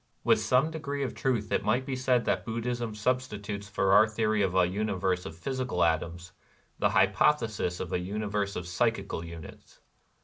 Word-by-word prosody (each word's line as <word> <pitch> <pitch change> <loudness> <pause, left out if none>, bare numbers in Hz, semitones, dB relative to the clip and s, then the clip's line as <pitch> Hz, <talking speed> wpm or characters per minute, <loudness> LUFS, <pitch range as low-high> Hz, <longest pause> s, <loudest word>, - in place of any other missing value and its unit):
With - - +4
some 130 +5 +2
degree 145 -3 -3
of 130 - -3
truth 120 -6 -1
it - - +1
might 120 +5 +1
be 135 -1 -3
said 130 -2 +1
that - - 0
Buddhism 115 0 -3
substitutes 105 -3 -2
for 95 -1 +1
our 105 +2 +7
theory 110 -1 0
of 95 -2 0
a 95 -1 +5
universe 95 -1 -1
of 80 - -9
physical 125 -3 -1
atoms 85 +1 -1 0.5
the - - +3
hypothesis 100 -2 +2
of 90 - -5
a - - +1
universe 100 +1 -2
of 90 - -4
psychical 100 -2 -1
units. 85 -2 -11
105 Hz, 170 wpm, -29 LUFS, 95-125 Hz, 0.5 s, our